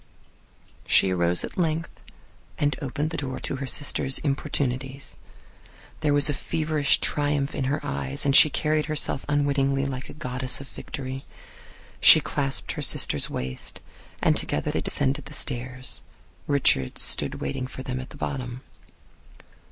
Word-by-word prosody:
She 95 - +4
arose 85 -1 +3
at - - -6
length 165 -1 -2 0.6
and 145 0 +1
opened 145 +3 -3
the 165 - -4
door 130 -2 -4
to 135 - -4
her 135 0 -5
sister's 135 0 +3
importunities. 135 -2 -3 0.8
There 150 -2 +1
was 145 +1 +7
a 145 - +1
feverish 155 0 +1
triumph 145 -1 0
in 135 - -2
her 145 +3 0
eyes, 70 - -1
and 140 -1 +3
she 155 - +9
carried 150 +1 0
herself 155 -3 -1
unwittingly 140 -1 +1
like 130 -2 -5
a - - -9
goddess 130 -4 -1
of 140 - -10
Victory. 135 0 -7 0.8
She - - +9
clasped 135 -1 -1
her - - -5
sister's - - +2
waist, 65 0 -5 0.4
and - - +4
together - - 0
they - - -1
descended 140 +3 0
the - - -9
stairs. 130 0 -1 0.5
Richards 125 - +2
stood - - +1
waiting 70 - -4
for 130 +1 -9
them 130 0 -4
at 130 - -8
the - - -12
bottom. 125 -3 -5
135 Hz, 150 wpm, -25 LUFS, 130-145 Hz, 0.8 s, she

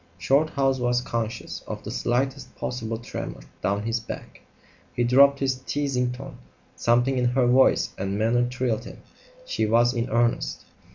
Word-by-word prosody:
Shorthouse 135 - +2
was 120 0 +2
conscious 115 -2 -4
of - - -6
the - - -6
slightest 130 +1 -1
possible 115 -2 -3
tremor 120 - -6 0.2
down 100 +1 0
his 115 +1 -1
back. 115 - -9 0.5
He 120 - +1
dropped 140 +3 +6
his 135 -2 0
teasing 130 -3 -1
tone. 130 +2 -9 0.4
Something 120 +3 +2
in 125 - +1
her 125 +1 +2
voice 130 +2 +4
and 95 +1 -2
manner 120 +3 +2
thrilled 125 -3 -1
him. - - -11 0.4
She 110 - -1
was 120 +3 +4
in 120 0 -2
earnest. 120 +1 0
120 Hz, 155 wpm, -25 LUFS, 115-130 Hz, 0.5 s, dropped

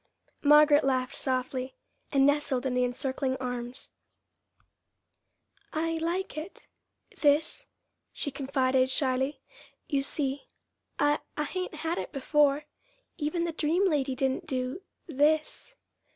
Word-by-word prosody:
Margaret 295 0 +6
laughed 260 -1 0
softly, 255 0 -2 0.4
and 275 -1 +4
nestled 285 -2 +1
in 260 - 0
the 250 0 +2
encircling 260 +1 -1
arms. 245 -1 -5 1.8
"I 325 +1 -1
like 345 +4 -2
it 310 +5 -8 0.5
this," 305 +12 +2 0.4
she 285 - -3
confided 265 -1 +1
shyly. 265 +1 +1 0.5
"You 280 -3 +1
see, 275 0 -2 0.5
I 290 +1 +3 0.2
I 300 - +1
hain't 365 +2 -4
had 335 +2 0
it - - -5
before. 290 +1 +2 0.5
Even 335 +3 -1
the 340 - -1
dream 330 +5 +2
lady 280 -6 0
didn't 265 0 -1
do 255 +6 -2 0.2
this." 310 - 0
285 Hz, 115 wpm, -29 LUFS, 260-310 Hz, 1.8 s, Margaret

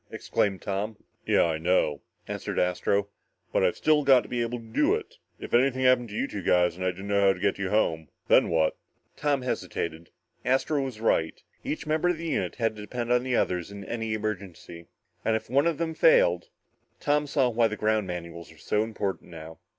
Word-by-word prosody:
exclaimed 100 -3 -1
Tom. 105 +2 -3 0.3
"Yeah - - +4
I 80 -2 0
know," 80 -4 +1 0.3
answered - - -4
Astro, 100 +3 +1 0.4
"but - - +2
I've - - +2
still 155 -1 +3
got 135 -3 +6
to - - -12
be 120 -1 -1
able 120 +1 -2
to 115 - -11
do 110 - +2
it. - - -7 0.2
If - - -8
anything 130 +1 +3
happened 125 -2 +4
to 105 - -8
you 135 - -1
two 105 - -5
guys 90 -1 +3
and 95 - -6
I 95 - +2
didn't 95 +2 -7
know 100 0 +2
how 95 - +5
to 90 - -11
get - - 0
you 100 -1 -1
home, 80 -7 0 0.2
then - - +5
what?" 80 -2 +2 0.4
Tom 145 -3 0
hesitated. 85 -9 -4 0.3
Astro 135 +3 +1
was 130 -5 -5
right. 80 -8 +1 0.2
Each 155 - -4
member 155 +3 +1
of 175 - 0
the 165 - -6
unit - - -1
had 115 -3 0
to - - -7
depend 120 +3 -4
on 125 - +3
the 130 -1 -1
other 90 -5 +1
in 100 +3 -9
any 115 -1 -3
emergency. 95 -5 -6 0.4
And 110 - +2
if 110 - -5
one 140 +5 +3
of 165 -3 0
them 165 -1 -2
failed...? - - +4 0.5
Tom 150 -1 +1
saw 135 -3 +2
why 115 -1 +3
the 110 0 -5
ground 110 -2 +1
manuals 85 -1 -7
were 80 - -17
so 105 +6 0
important 105 -5 -3
now. 80 -1 -10
110 Hz, 210 wpm, -27 LUFS, 90-130 Hz, 0.5 s, got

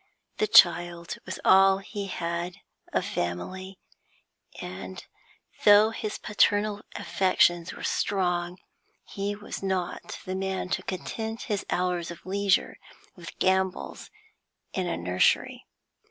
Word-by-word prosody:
The 430 - +2
child 175 - +4
was 185 - -5
all 195 0 +6
he 200 0 -6
had 170 0 -3 0.4
of - - 0
family, 185 - -4 0.8
and, 95 +1 -7 0.6
though 210 +1 +7
his 215 -1 -4
paternal 205 0 +2
affections 175 -2 +2
were - - -10
strong, 180 -2 0 0.5
he 200 +1 -4
was 210 +1 -7
not 190 -2 -3
the 185 - -3
man 190 -1 -2
to - - -1
content 220 +5 -5
his 210 -4 -3
hours 180 -2 -1
of 170 - -10
leisure 195 0 +1 0.4
with 170 -2 -11
gambols 190 -1 0 0.6
in 185 -2 -1
a - - -2
nursery. 90 +1 +1
185 Hz, 115 wpm, -27 LUFS, 175-200 Hz, 0.8 s, though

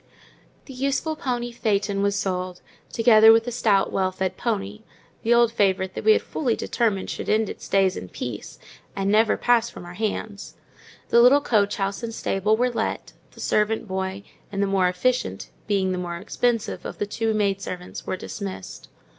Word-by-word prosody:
The 270 - -10
useful 275 +4 -1
pony 240 -4 -3
phaeton 200 -4 0
was 200 0 +1
sold, 185 -2 -2 0.3
together 225 -1 +7
with 225 0 +5
the 245 - -4
stout, 215 -5 +2
well 190 -1 0
fed 185 0 -2
pony—the 215 +1 -5
old 235 -1 +5
favourite 190 -4 +1
that - - -5
we 435 - +7
had - - 0
fully 245 -7 -1
determined 215 -5 -1
should - - -5
end 215 0 +2
its - - -8
days 195 -1 +3
in 90 - -7
peace, - - -6 0.4
and 195 0 0
never 220 +1 +4
pass 240 -1 +2
from - - -11
our 175 - -9
hands; 210 0 -4 0.5
the 235 - +6
little 255 +4 +7
coach 210 -7 +1
house 195 -1 -2
and 230 -1 -5
stable 210 +3 +1
were 250 +1 +1
let; 235 - -3 0.2
the - - -16
servant 215 +1 0
boy, 190 +1 -3 0.3
and 195 - -4
the - - +3
more 195 -2 +2
efficient 180 - -1 0.2
(being 195 -3 +1
the 180 - -2
more 175 -1 -4
expensive) 230 +4 -1
of - - -7
the - - -1
two 220 +1 -1
maid 200 -2 0
servants, 180 -2 -7
were 185 - -2
dismissed. 195 - -7
205 Hz, 180 wpm, -24 LUFS, 190-230 Hz, 0.5 s, together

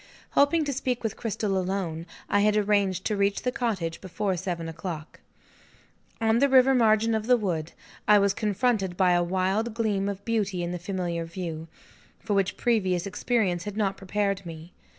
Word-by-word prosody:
Hoping 300 +3 +3
to 285 - -1
speak 250 -2 -2
with 220 -2 -2
Cristel 210 -3 -2
alone, 180 -3 -2 0.2
I 205 - +2
had 210 +1 +3
arranged 200 -3 +1
to 215 - 0
reach 200 0 0
the 250 - 0
cottage 195 -10 -2
before 190 +1 -2
seven 175 -2 -4
o'clock. 160 -1 -7 1.0
On 225 +1 +2
the 280 +1 +4
river 265 0 +6
margin 225 -2 +3
of 220 0 -1
the 250 -1 +5
wood, 170 -7 -3 0.3
I 210 - +7
was 200 -1 +3
confronted 205 -3 0
by 185 -2 +4
a 175 0 +3
wild 190 +5 0
gleam 205 -4 0
of 200 0 -6
beauty 205 -6 -1
in 175 - -3
the 180 - -4
familiar 175 -2 -3
view, 165 -2 -6 0.5
for 210 - -3
which 195 -2 +1
previous 190 -7 +1
experience 195 -4 0
had 205 0 -5
not 195 -3 0
prepared 195 0 -1
me. 165 0 -10
200 Hz, 175 wpm, -26 LUFS, 180-220 Hz, 1.0 s, I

